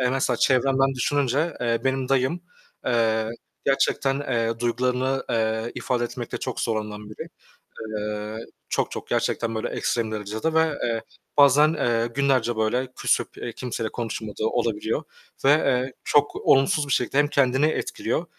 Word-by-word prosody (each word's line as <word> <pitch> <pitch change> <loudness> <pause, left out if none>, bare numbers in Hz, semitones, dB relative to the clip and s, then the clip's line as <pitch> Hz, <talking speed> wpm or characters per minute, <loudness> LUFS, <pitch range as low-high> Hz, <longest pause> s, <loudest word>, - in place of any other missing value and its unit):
Eee, 125 - +2
mesela 130 -2 +1
çevremden 135 +2 +3
düşününce, 145 +4 +1
eee, 115 -1 +1
benim 130 -1 0
dayım, 135 +6 +1 0.5
eee, 110 -2 +2 0.4
gerçekten, 135 0 +2
eee, 115 -4 -1
duygularını, 125 +2 0
eee, 110 0 0
ifade 120 -1 -1
etmekte 120 0 -5
çok - - -4
zorlanan 105 -2 -3
biri. - - -8 0.7
Eee, 105 +1 -4 0.2
çok - - 0
çok - - -6
gerçekten 115 -1 0
böyle 110 - -2
ekstrem 115 -2 -1
derecede 110 +8 -2
ve 160 -2 +2 0.6
bazen, 145 +3 +6
eee, 115 -5 +1
günlerce 130 -4 +2
böyle 125 +4 +1
küsüp, - - +1
eee, 120 - -5
kimseyle 115 -2 -3
konuşmadığı 110 -2 -4
olabiliyor 115 +3 -1 0.4
ve, - - +6
eee, 130 -3 +2
çok 145 0 +3
olumsuz 135 +2 +3
bir 135 - +1
şekilde 125 +2 0
hem 145 0 +5
kendini 140 0 +3
etkiliyor 155 +1 -1
125 Hz, 140 wpm, -24 LUFS, 115-135 Hz, 0.7 s, bazen